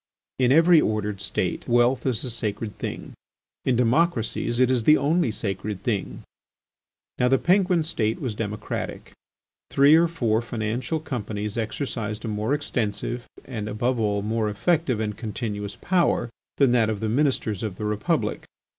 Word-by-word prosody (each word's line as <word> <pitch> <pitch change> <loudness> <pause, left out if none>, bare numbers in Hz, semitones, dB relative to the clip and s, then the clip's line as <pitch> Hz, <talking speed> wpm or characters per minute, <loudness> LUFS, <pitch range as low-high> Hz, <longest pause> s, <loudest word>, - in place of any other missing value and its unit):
In 125 -1 +4
every 165 +2 +6
ordered 105 -2 -1
State, 95 -2 -2
wealth 120 +1 +3
is 120 -4 0
a 125 - -3
sacred 105 -2 -3
thing: - - -6 0.5
in 130 - +2
democracies 120 -2 +1
it 130 0 +4
is 125 -3 +1
the 150 +6 +6
only 155 +1 +2
sacred 100 -1 -4
thing. 105 -5 -2 1.0
Now 125 - +4
the 135 +1 +4
Penguin 180 -1 +3
State 115 -9 -1
was 125 -5 -3
democratic. 105 -1 -5 0.6
Three 140 +2 +5
or 165 +1 +6
four 120 -10 0
financial 120 +6 -2
companies 105 -7 -4
exercised 110 -2 -3
a - - -2
more 110 +6 0
extensive, 120 -3 -3 0.2
and 110 -5 -5
above 120 +4 0
all, 105 -2 0
more 110 0 0
effective 130 +3 +1
and 105 -1 -2
continuous 105 -2 -4
power, 175 -10 +1 0.3
than 135 -3 +4
that 115 -3 +3
of 110 -2 -2
the 110 - -2
Ministers 115 -5 0
of 110 -5 -3
the 105 - -5
Republic. 105 0 -1
115 Hz, 155 wpm, -25 LUFS, 105-135 Hz, 1.0 s, every